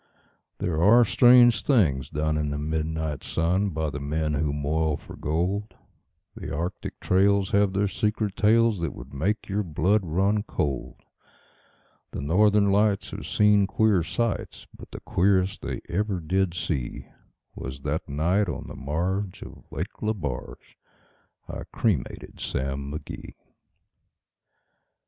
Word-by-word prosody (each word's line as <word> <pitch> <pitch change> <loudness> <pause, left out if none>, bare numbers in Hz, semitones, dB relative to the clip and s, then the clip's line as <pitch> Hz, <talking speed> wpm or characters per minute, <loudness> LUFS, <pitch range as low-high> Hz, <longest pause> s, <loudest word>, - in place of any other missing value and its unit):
There 80 -3 -1
are 115 +6 +7
strange 120 +1 +6
things 80 - +2
done 75 +1 -1
in 75 -1 -1
the 70 - -3
midnight 80 0 -2
sun 90 +5 0
By 80 -3 -2
the 70 - -5
men 75 +2 -1
who 75 0 0
moil 75 +1 0
for - - -12
gold; 90 +8 -2 0.6
The - - -7
Arctic 85 +6 -4
trails 100 +1 +2
have 100 -1 +3
their 100 +1 +1
secret 105 0 -1
tales 110 -1 +3
That 85 -3 -3
would 60 +3 -11
make 95 +10 -1
your 100 +1 0
blood 90 +4 +1
run 95 +5 +1
cold; 70 - -3 1.1
The - - -4
Northern 100 +6 +3
Lights 100 0 +2
have - - -6
seen 105 -1 +4
queer 105 -2 +3
sights, 115 +6 -3
But - - -12
the - - -9
queerest 95 0 +1
they - - -4
ever 95 +2 -1
did 90 +2 0
see 70 -8 -3 0.5
Was 65 +1 -7
that - - -3
night 85 +8 +1
on - - -5
the - - -8
marge 90 +7 -2
of - - -13
Lake - - -5
Lebarge 75 - -4 0.7
I - - -6
cremated 95 - -2
Sam 70 +1 -3
McGee. 75 +2 -8
90 Hz, 135 wpm, -26 LUFS, 75-105 Hz, 1.1 s, are